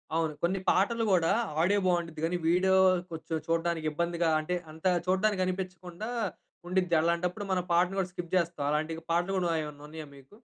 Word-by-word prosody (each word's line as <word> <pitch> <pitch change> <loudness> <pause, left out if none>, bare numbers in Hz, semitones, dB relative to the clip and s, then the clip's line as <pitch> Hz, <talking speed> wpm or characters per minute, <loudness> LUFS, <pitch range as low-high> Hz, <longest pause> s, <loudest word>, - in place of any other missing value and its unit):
అవును. 160 -2 0
కొన్ని 185 +3 +1
పాటలు 225 +5 +2
కూడా 170 -3 +3 0.3
ఆడియో 200 +4 +3
బావుండ్డిద్ది 170 -3 0
గాని, 175 +2 0
వీడియో 185 +3 +3 0.4
కొంచెం 160 0 -4
చూడ్డానికి 165 -1 0
ఇబ్బందిగా, 170 +1 0
అంటే 155 +4 -2 0.2
అంత 160 +2 -14 0.2
చూడ్డానికి 190 +1 +2
అనిపించకుండా 185 +2 -5 0.6
ఉండిద్ది. 180 -1 +1
అలాంటప్పుడు 175 +4 0
మనం 185 -1 +1
పాటను 180 +3 +2
కూడా 185 -1 -1
స్కిప్ 175 -1 -7
జేస్తాం. 170 -4 0
అలాంటి 155 +2 -1
పాటలు 175 +3 +1
కూడా 175 -2 +1
ఏమన్నా 150 -1 -9
ఉన్నాయా 155 0 -8
మీకు? 140 +8 -17
175 Hz, 160 wpm, -29 LUFS, 165-185 Hz, 0.6 s, కూడా